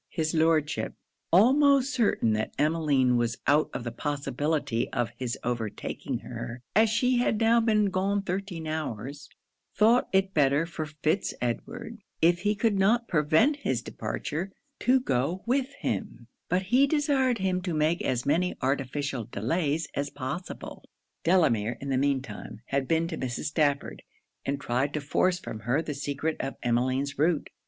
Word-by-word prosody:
His 160 -1 -1
Lordship, 160 -1 +1 0.4
almost 275 - +5
certain 210 - +2
that 110 0 -2
Emmeline 145 -5 +2
was 120 -1 0
out 150 +2 +3
of 125 - -5
the 120 - -4
possibility 140 -1 -1
of 120 -2 -1
his 125 -2 -3
overtaking 115 -3 -3
her, 120 +2 -7
as 220 +2 +5
she 250 +3 +2
had 225 -3 +1
now 230 +1 +4
been 215 -3 +2
gone 195 +2 0
thirteen 185 -3 -4
hours, 145 -3 -5 0.5
thought 230 +4 +4
it 190 0 +2
better 145 +1 +3
for 165 -2 -5
Fitz 155 +5 -1
Edward, 225 - -4 0.2
if 175 +1 +4
he 210 +3 +1
could 205 -1 +1
not 230 +5 +3
prevent 165 - +3
his 285 - -2
departure, 175 +6 -4 0.3
to 260 +2 +4
go 165 - -1
with 265 +2 +1
him: - - -3 0.2
but 185 +1 +1
he 250 +9 +4
desired 280 -4 +2
him 185 -2 0
to 180 -1 -3
make 155 +2 +1
as 125 -1 -1
many 170 +5 +1
artificial 135 -1 -1
delays 150 - -1
as 140 0 -2
possible. 145 +7 -6 0.4
Delamere, 120 - +2
in 140 - -6
the 135 - +1
mean 140 -1 +1
time, 105 -2 -9
had 135 -1 0
been 165 0 +2
to 160 - -5
Mrs. 125 -2 -3
Stafford, 145 -2 0 0.5
and 140 0 -1
tried 135 +2 -1
to - - 0
force 175 +5 +1
from 110 -11 -7
her 120 +7 0
the 160 -2 -3
secret 145 +3 -2
of 135 - -3
Emmeline's 130 +4 0
route. 160 0 +1
155 Hz, 160 wpm, -27 LUFS, 135-195 Hz, 0.5 s, almost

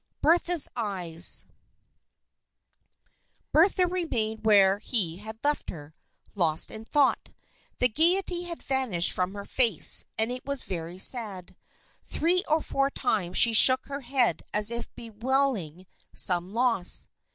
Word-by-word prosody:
Bertha's 345 0 +3
Eyes 185 -7 +2 2.1
Bertha 365 +3 +3
remained 235 -12 -4
where 200 -2 +3
he 195 -7 0
had 220 +2 -10
left 295 +1 -2
her, 150 -2 -10 0.4
lost 165 -5 +1
in 220 0 -6
thought. 285 +3 0 0.4
The 250 - +2
gayety 350 - 0
had 340 -1 -8
vanished 250 -11 -1
from 185 +2 -3
her 200 0 -8
face, 230 - +3
and 220 +2 -1
it 250 0 -7
was 280 -1 -4
very 170 -1 -7
sad. 195 -4 -1 0.5
Three 350 +3 0
or 310 +1 +1
four 275 0 -1
times 190 -9 -3
she 230 - +3
shook 255 +3 +5
her 280 0 -7
head 250 -1 -1
as 210 +2 +3
if 235 0 -5
bewailing 225 - -3 0.3
some 180 0 +2
loss. 230 -5 +2
225 Hz, 130 wpm, -26 LUFS, 190-275 Hz, 2.1 s, shook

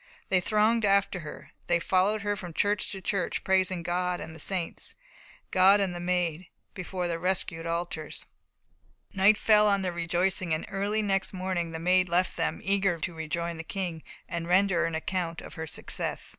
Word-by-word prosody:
They 190 - +4
thronged 215 +4 +2
after 195 -2 +2
her. 155 -3 -10 0.2
They 175 0 +3
followed 195 +4 +2
her 205 0 0
from 175 -5 -8
church 205 -1 +1
to 195 - -6
church, 195 0 -1
praising 185 -2 +1
God 180 +1 -1
and 160 - -7
the 160 - -11
saints, 180 +1 -3 0.6
God 190 +2 +6
and 195 -3 0
the 175 - -5
Maid, 175 -1 -1 0.3
before 180 -1 -3
their 165 -1 -2
rescued 175 -2 -1
altars. 165 -2 -4 0.9
Night 195 +3 +5
fell 210 -1 +5
on 200 -1 +2
their 180 - -1
rejoicings, 175 0 0
and 155 - -4
early 205 +2 0
next 195 -1 0
morning 185 -2 -2
the 165 - -5
Maid 180 +2 +3
left 180 +2 +2
them, - - -1
eager 195 -2 +2
to 170 +2 -3
rejoin 165 +1 -3
the 165 - -6
King, 175 -3 -4 0.3
and 170 0 -4
render 180 -1 +3
an 165 -1 -2
account 170 +1 -2
of - - -10
her 160 -1 -6
success. 145 - -3
180 Hz, 180 wpm, -28 LUFS, 170-195 Hz, 0.9 s, God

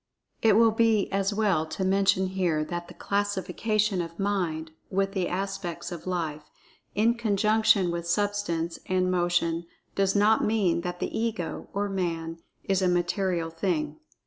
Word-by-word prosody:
It 220 -2 +5
will 225 0 +6
be 220 -2 +2
as 195 +1 +1
well 200 -7 +1
to 185 +4 -3
mention 190 -1 +3
here 175 -5 0
that 175 +1 -5
the - - -12
classification 205 0 0
of 165 0 -7
Mind 175 -6 -1 0.2
with 195 0 0
the 190 -3 -1
aspects 190 -2 -4
of 175 0 -7
Life, 155 -4 -3 0.5
in 225 +3 +4
conjunction 215 -3 +3
with 170 0 -4
Substance, 175 -3 -1
and 185 0 +1
Motion, 175 -1 +1 0.3
does 195 0 +1
not 210 +2 +4
mean 200 -6 +2
that 180 0 -5
the - - -2
Ego 220 -7 -2
or 205 +1 -1
Man 165 -4 -3 0.2
is 195 -1 +1
a 185 - +3
material 175 -1 0
thing. 165 - -2
190 Hz, 150 wpm, -27 LUFS, 170-205 Hz, 0.5 s, will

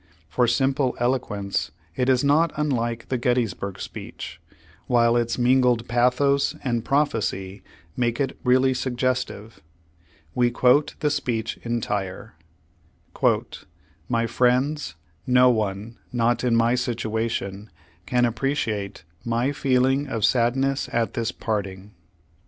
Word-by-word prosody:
For 120 +10 +1
simple 135 +2 +1
eloquence 105 -8 -1 0.3
it 125 +5 0
is 130 0 +3
not 155 +3 +3
unlike 120 -6 -1
the 130 - -1
Gettysburg 115 -6 -1
speech, - - -8 0.5
while 120 -1 +3
its 120 -1 0
mingled 125 -2 +3
pathos 140 +4 +2
and 120 -4 -1
prophecy 110 -9 -1 0.3
make 120 -1 0
it 135 -2 -1
really 130 +1 +4
suggestive. 125 -3 -2 0.7
We 120 -1 +3
quote 125 +4 +3
the 150 -2 +2
speech 115 -5 -2
entire: 105 -4 -3 1.8
"My 115 -1 +1
friends, 125 - +1 0.3
no 125 0 +6
one, 110 0 -3
not 120 0 +1
in 120 -2 +2
my 115 +1 +3
situation, 110 -4 -2 0.4
can 125 +5 +2
appreci 120 +1 0
ate 100 -5 -6 0.2
my 120 +3 0
feeling: 135 0 +1
of 115 -6 0
sadness 135 +3 +1
at 115 -1 0
this 115 -1 -1
parting. 100 -2 -4
120 Hz, 115 wpm, -24 LUFS, 115-130 Hz, 1.8 s, no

